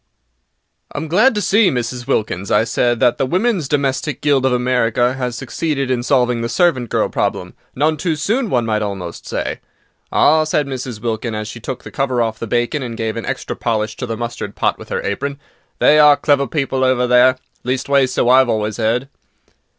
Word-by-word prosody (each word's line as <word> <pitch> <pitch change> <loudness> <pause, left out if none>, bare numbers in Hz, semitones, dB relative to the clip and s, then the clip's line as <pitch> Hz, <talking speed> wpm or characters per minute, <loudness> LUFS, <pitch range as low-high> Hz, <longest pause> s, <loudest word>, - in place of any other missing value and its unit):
"I - - -6
AM 160 +2 -3
glad 215 +10 +3
to 210 - 0
see, 205 +2 +4
Mrs. 125 -3 -3
Wilkins," 100 -3 -1
I 105 - +3
said, 120 +1 0
"that 120 -2 +3
the 135 - +2
Women's 185 - 0
Domestic 140 0 -1
Guild 140 -3 +2
of - - +1
America 125 -1 +1
has 125 -2 -3
succeeded 135 +2 -2
in 125 -2 0
solving 125 -2 +1
the 115 - -2
servant 150 - +1
girl - - +1
problem—none 155 +3 -2
too 160 +1 -1
soon, 220 - -1
one 120 -6 +1
might 110 -1 0
almost 95 -5 -5
say." - - -3 0.5
"Ah," 155 +1 +4
said 155 -1 0
Mrs. 130 -4 -5
Wilkins, 115 -1 -2
as 105 0 -4
she 115 - -8
took 125 +3 -6
the - - -10
cover 135 -3 -1
off 110 -2 -1
the 115 - -5
bacon 120 +6 0
and 120 -3 -5
gave 110 -1 -2
an 115 - -5
extra - - -4
polish 110 -1 -2
to 125 - -4
the 115 -1 -4
mustard 120 -3 -5
pot - - 0
with - - -11
her - - -2
apron, 140 +7 -3 0.4
"they 150 - +5
are 150 -1 +7
clever 140 -2 +2
people 135 0 -1
over 130 -1 +2
there; 125 +1 +5 0.3
leastways, 130 +1 +1
so 125 - 0
I've 130 0 +5
always 110 0 -1
'eard." 115 +4 0
125 Hz, 195 wpm, -18 LUFS, 115-145 Hz, 0.5 s, are